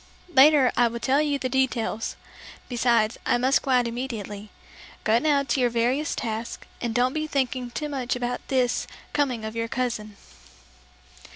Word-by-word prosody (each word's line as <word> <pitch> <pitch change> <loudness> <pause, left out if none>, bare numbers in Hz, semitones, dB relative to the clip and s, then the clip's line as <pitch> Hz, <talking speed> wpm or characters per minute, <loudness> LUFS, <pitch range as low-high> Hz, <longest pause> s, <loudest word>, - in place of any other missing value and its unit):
Later 275 -1 +7
I 240 0 +4
will 235 0 -4
tell 275 +4 +2
you 295 -2 0
the 265 - -2
details; 245 -4 -1 0.5
besides, 235 -3 +1
I - - +2
must 260 +3 +3
go 275 - -6
out 250 -2 +3
immediately. 220 -4 -5 0.5
Go 220 +2 +3
now 285 0 +2
to 275 - -1
your 245 -1 +3
various 245 +6 0
tasks 225 -1 -4 0.2
and 235 -2 -2
don't 250 +2 +2
be 310 0 -2
thinking 260 -3 -1
too 300 +5 -4
much 260 -4 -2
about 245 0 -3
this 250 -2 +1 0.3
coming 255 -7 0
of 220 +1 -6
your 230 0 -1
cousin." 225 -4 -3
245 Hz, 165 wpm, -25 LUFS, 230-265 Hz, 0.5 s, Later